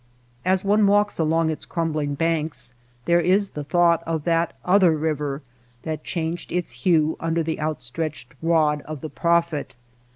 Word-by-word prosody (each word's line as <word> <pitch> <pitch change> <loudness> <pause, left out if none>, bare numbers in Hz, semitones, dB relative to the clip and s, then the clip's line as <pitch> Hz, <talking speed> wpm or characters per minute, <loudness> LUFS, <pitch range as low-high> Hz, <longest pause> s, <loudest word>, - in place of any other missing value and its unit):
As 190 +1 +1
one 205 +1 +4
walks 205 0 +2
along 160 0 +2
its 155 - -6
crumbling 155 -4 -2
banks 160 -5 -1 0.3
there 170 0 +4
is 190 +4 +2
the 150 - -6
thought 170 +2 +3
of 160 -2 -1
that 165 0 +1
other 180 -4 +4
river 150 -2 -2 0.4
that 155 -1 -4
changed 165 0 -3
its 175 -6 -2
hue 155 +5 +2
under 165 0 0
the 160 0 -3
outstretched 150 -1 -4
rod 155 -3 +2
of 155 -3 -7
the 155 - -5
prophet. 170 -5 0
165 Hz, 155 wpm, -23 LUFS, 155-170 Hz, 0.4 s, one